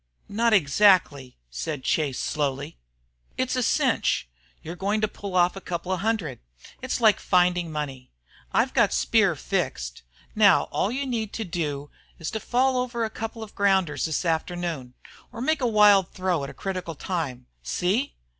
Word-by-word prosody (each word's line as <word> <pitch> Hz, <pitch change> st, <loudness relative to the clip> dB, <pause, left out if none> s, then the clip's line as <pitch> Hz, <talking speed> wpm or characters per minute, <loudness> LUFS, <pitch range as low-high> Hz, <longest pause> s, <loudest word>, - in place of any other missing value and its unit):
"Not 230 Hz, +3 st, +1 dB
exactly," 160 Hz, -, +3 dB
said 135 Hz, -, -4 dB
Chase, 145 Hz, -5 st, 0 dB
slowly. 145 Hz, 0 st, -2 dB, 0.6 s
"It's 255 Hz, 0 st, 0 dB
a 255 Hz, -, +1 dB
cinch. 225 Hz, -, +1 dB, 0.4 s
You're 165 Hz, +2 st, -6 dB
going 200 Hz, +4 st, -1 dB
to 215 Hz, -, +2 dB
pull 200 Hz, -2 st, -7 dB
off 180 Hz, +1 st, +3 dB
a 195 Hz, -, -7 dB
couple 175 Hz, +1 st, -4 dB
of 185 Hz, -, 0 dB
hundred. 195 Hz, -, -1 dB, 0.4 s
It's 260 Hz, 0 st, -2 dB
like 220 Hz, -4 st, +5 dB
finding 180 Hz, -2 st, +2 dB
money. 135 Hz, -4 st, -5 dB, 0.4 s
I've -, -, +1 dB
got -, -, +3 dB
Speer 60 Hz, 0 st, +3 dB
fixed. -, -, -3 dB, 0.3 s
Now 205 Hz, -4 st, +5 dB
all 200 Hz, -, 0 dB
you 275 Hz, +3 st, -2 dB
need 225 Hz, -5 st, -3 dB
to 225 Hz, -, -3 dB
do 150 Hz, -6 st, -4 dB, 0.3 s
is 165 Hz, -, -5 dB
to 220 Hz, -, -3 dB
fall 255 Hz, +4 st, +1 dB
over 240 Hz, -2 st, -1 dB
a 220 Hz, -, -5 dB
couple 225 Hz, 0 st, -6 dB
of 215 Hz, -, -11 dB
grounders 190 Hz, -7 st, +1 dB
this 160 Hz, +2 st, -2 dB
afternoon 165 Hz, -5 st, -2 dB, 0.4 s
or 230 Hz, -, -9 dB
make 300 Hz, +4 st, 0 dB
a 250 Hz, -, +2 dB
wild 210 Hz, -4 st, +5 dB
throw 185 Hz, -5 st, -1 dB
at 140 Hz, -, -5 dB
a -, -, -10 dB
critical 185 Hz, -4 st, -4 dB
time. 140 Hz, -7 st, -4 dB, 0.2 s
See!" 185 Hz, -, -1 dB
180 Hz, 165 wpm, -25 LUFS, 150-220 Hz, 0.6 s, like